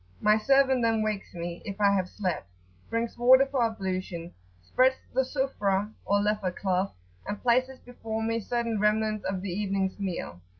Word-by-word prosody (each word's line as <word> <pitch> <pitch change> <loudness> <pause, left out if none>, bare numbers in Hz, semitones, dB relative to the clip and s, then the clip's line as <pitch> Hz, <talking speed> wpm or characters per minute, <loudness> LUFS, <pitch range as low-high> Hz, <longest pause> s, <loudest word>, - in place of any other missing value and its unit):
My 210 0 +4
servant 265 +3 +3
then 225 -1 +2
wakes 215 -2 -3
me, 170 0 -5
if 200 0 -6
I 200 -1 +5
have 190 -2 0
slept; 180 - -3 0.4
brings 230 +1 -2
water 260 +2 +7
for 270 -3 0
ablution, 185 -6 -3 0.3
spreads 255 - +3 0.2
the 260 - +3
Sufrah[FN# 230 -8 0
3] - - -21
(or 200 +1 +2
leather 210 -3 0
cloth); 190 +1 -1 0.3
and 205 0 -3
places 255 +2 +2
before 225 -2 -5
me 230 +1 0
certain 230 0 -2
remnants 215 0 +1
of 190 0 -2
the 200 - -3
evening's 195 +1 -1
meal. 175 - -4
210 Hz, 170 wpm, -28 LUFS, 190-235 Hz, 0.4 s, water